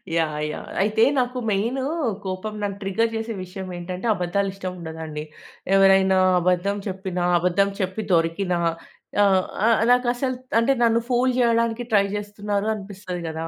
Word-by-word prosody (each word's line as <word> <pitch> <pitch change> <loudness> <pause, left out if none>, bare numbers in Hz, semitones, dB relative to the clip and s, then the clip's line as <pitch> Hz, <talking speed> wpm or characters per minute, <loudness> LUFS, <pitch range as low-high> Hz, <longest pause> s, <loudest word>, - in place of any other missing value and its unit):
Yeah! 155 -2 0
Yeah! - - -8
అయితే 215 +2 +3 0.2
నాకు 250 0 -1
మెయినూ 230 +7 0 0.4
కోపం 190 +3 -4
నన్ను 200 -1 -2
ట్రిగ్గర్ 225 +4 0
చేసే 225 0 -3
విషయమేంటంటే, 180 +1 -6
అబద్దాలు 195 +2 -1
ఇష్టముండదండి. 160 -5 -6 0.5
ఎవరైనా 195 -1 +5 0.2
అబద్ధం 185 +3 +1
చెప్పినా, 185 -2 -3 0.2
అబద్ధం 180 +3 +2
చెప్పి 190 +4 -2
దొరికినా 170 +2 +1 0.6
ఆహ్, 190 -2 +4 0.2
ఆహ్, 230 - +4
నాకసలు 250 +1 +1 0.2
అంటే 230 +4 +3
నన్ను 230 0 +4
ఫూల్ 250 +1 +2
చేయడానికి 230 -1 +2
ట్రై 200 -1 +5
చేస్తున్నారు 205 0 -3
అనిపిస్తది 190 -3 -7
గదా! 160 +1 -4
195 Hz, 130 wpm, -23 LUFS, 180-225 Hz, 0.6 s, ఎవరైనా